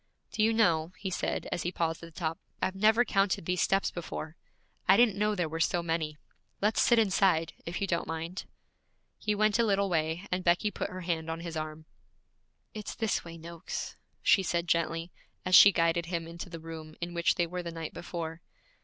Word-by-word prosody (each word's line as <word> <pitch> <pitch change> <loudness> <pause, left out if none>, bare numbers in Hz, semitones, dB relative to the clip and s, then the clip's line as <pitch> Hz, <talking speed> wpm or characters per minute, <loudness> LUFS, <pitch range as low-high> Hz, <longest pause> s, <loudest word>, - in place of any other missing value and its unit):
'Do 215 - -1
you 220 +1 +4
know,' 175 -7 +2
he 190 - -4
said, - - -2
as 175 - -1
he 175 - -2
paused 165 -2 -1
at 170 0 -10
the 160 - -11
top, 165 -1 -2 0.2
'I've 185 - 0
never 220 +5 +4
counted 195 -5 +1
these 180 0 0
steps 195 0 +2
before. 160 -2 -6 0.5
I 190 - +7
didn't 235 -4 +5
know 210 +1 +1
there 175 -4 0
were 160 +1 -5
so 170 +1 +1
many. 165 -2 -2 0.4
Let's 210 +2 +2
sit 240 - +5
inside, 190 -6 +3
if 170 - -3
you 200 - 0
don't 170 -3 -1
mind.' 165 +3 -4 0.7
He 210 - 0
went 215 +1 +2
a - - +5
little 200 -2 +2
way, 160 +2 0
and 180 0 -1
Becky 175 +4 +2
put - - -3
her 185 0 -7
hand 165 -2 -2
on 165 +1 -4
his 170 -1 -6
arm. 155 0 -5 0.9
'It's 210 -2 -6
this 225 -3 0
way, 165 0 -9
Noakes,' 165 0 -6 0.3
she 195 - +5
said 175 -2 -1
gently, 165 +1 0 0.3
as 185 - -1
she 200 +2 +10
guided 170 -1 +1
him 170 -2 -2
into 170 +3 -8
the 165 -1 -7
room 160 -1 -9
in 175 0 -4
which 170 0 +2
they 175 - +2
were 180 +2 -4
the 170 - -5
night 165 -1 -6
before. 165 -1 -5
170 Hz, 205 wpm, -30 LUFS, 165-195 Hz, 0.9 s, she